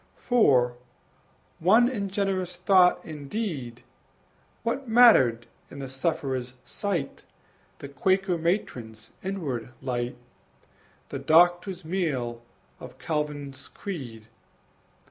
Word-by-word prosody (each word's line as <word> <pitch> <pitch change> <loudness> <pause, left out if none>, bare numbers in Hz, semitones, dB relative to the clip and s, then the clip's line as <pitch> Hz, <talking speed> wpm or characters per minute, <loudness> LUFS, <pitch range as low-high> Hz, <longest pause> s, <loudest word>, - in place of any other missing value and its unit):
For, 125 - +3 0.8
one 220 +8 +5
in 205 -6 -3
generous 190 -2 -1
thought 180 0 +4
and 150 -3 -8
deed, 145 - -4 0.8
What 235 +2 -2
mattered 135 - +6 0.2
in - - -11
the 135 -1 -5
sufferer's 130 -2 -2
sight 180 -9 -3 0.6
The 140 - -8
Quaker 185 +7 +1
matron's 120 - -3
inward 165 -12 -3
light, 120 -1 -3 0.9
The - - -5
Doctor's 175 +2 +3
mail 140 -10 -2 0.4
of 130 0 -11
Calvin's 145 0 -4
creed? 125 - -7
155 Hz, 95 wpm, -26 LUFS, 130-195 Hz, 0.9 s, mattered